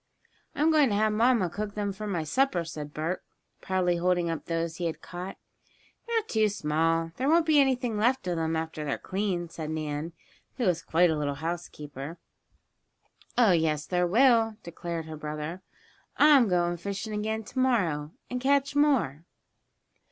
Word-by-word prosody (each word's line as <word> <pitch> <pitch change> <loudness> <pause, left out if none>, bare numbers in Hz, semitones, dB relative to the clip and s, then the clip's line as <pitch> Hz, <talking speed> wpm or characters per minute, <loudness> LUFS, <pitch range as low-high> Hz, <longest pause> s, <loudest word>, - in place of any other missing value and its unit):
"I'm 305 +2 +3
going 300 -4 +5
to 205 - 0
have 215 +1 +2
mamma 230 -3 +3
cook 205 +4 -5
them 205 -1 -2
for 210 +2 -6
my 175 -5 -1
supper," 180 - +1
said 150 -2 -7
Bert, 160 +5 -3 0.4
proudly 180 -2 +1
holding 175 -1 +1
up 165 - -5
those 165 -1 -2
he 175 - -1
had 160 - -4
caught. 180 +2 -7 0.7
"They're 460 -2 +1
too 220 - +1
small 165 -2 0
there 265 +3 0
won't 330 +1 +4
be 310 -2 +5
anything 255 -5 +2
left 250 +3 +2
of 180 -1 -1
them 160 0 -1
after 160 -1 -3
they're 140 -2 -2
cleaned," 185 -4 -2
said 155 -2 -6
Nan, 155 +1 -3 0.4
who 250 - 0
was 175 -3 +1
quite 165 +2 +3
a - - 0
little 145 -2 -2
housekeeper. 150 -1 -6 1.2
"Oh, 235 -5 +6
yes, 155 -3 +1
there 180 -1 +1
will," 225 +1 +4
declared 170 -1 -5
her 160 -1 -7
brother. 155 +4 -5 0.6
"I'm 290 -5 +6
going 175 -2 +1
fishing 200 +4 -5
again 220 +1 -2
tomorrow 200 - 0 0.2
and, 250 0 -4
catch 280 +1 +2
more." 260 - +2
180 Hz, 165 wpm, -28 LUFS, 160-225 Hz, 1.2 s, Oh